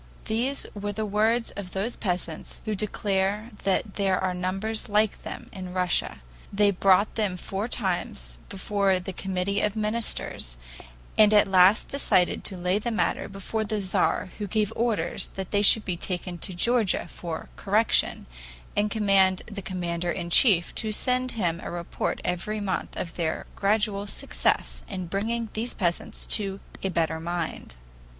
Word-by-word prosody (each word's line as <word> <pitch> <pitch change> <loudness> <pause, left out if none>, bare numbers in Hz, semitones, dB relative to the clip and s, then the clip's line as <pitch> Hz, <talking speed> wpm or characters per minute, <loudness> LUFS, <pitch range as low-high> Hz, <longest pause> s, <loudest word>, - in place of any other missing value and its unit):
These 245 +6 -1
were 205 0 -3
the 215 +1 -2
words 220 +3 +2
of 190 -3 -7
those 205 +5 -1
peasants, 175 -5 -4
who 215 - -1
declare 205 +1 0
that 195 +1 +1
there 195 -2 +2
are 185 -1 0
numbers 195 +5 -2
like 210 0 +2
them - - -7
Russia. 180 -1 -1 0.3
They 205 0 +4
brought 195 +2 +4
them 205 -5 0
four 195 +4 -3
times 175 - -2
before 195 -1 +1
the 185 +1 -6
Committee 190 +2 -1
of 210 0 0
Ministers, 215 - -2 0.6
and 215 0 +7
at 210 - +6
last 190 +2 +5
decided 185 -10 +2
to 190 - -2
lay 180 +3 +1
the 235 - -2
matter 225 - 0
before 200 +3 -3
the 215 0 -2
Tzar 190 -1 0
who 205 - -2
gave 215 +2 0
orders 230 -2 0
that 190 -2 -5
they 205 - +3
should 210 +1 +7
be 180 -3 -2
taken 180 -1 -3
to 185 - -2
Georgia 230 +1 +2
for 170 -2 -6
correction, 210 +3 +2 0.5
and 210 +1 +2
commanded 195 -3 +3
the 200 - -4
commander 175 -2 -3
in 170 -1 -3
chief 180 -5 +5
to 220 - -2
send 255 +3 +1
him 175 -7 0
a - - -4
report 170 0 -3
every 180 +5 -1
month 200 -2 -2
of 170 - -4
their 160 -2 -1
gradual 205 0 +1
success - - 0
in 185 -3 -4
bringing 220 +5 -2
these 230 +3 -3
peasants 175 -3 -2
to 195 -2 -1 0.2
a 195 - -1
better 160 -2 0
mind." 170 - -4
195 Hz, 155 wpm, -26 LUFS, 180-215 Hz, 0.6 s, and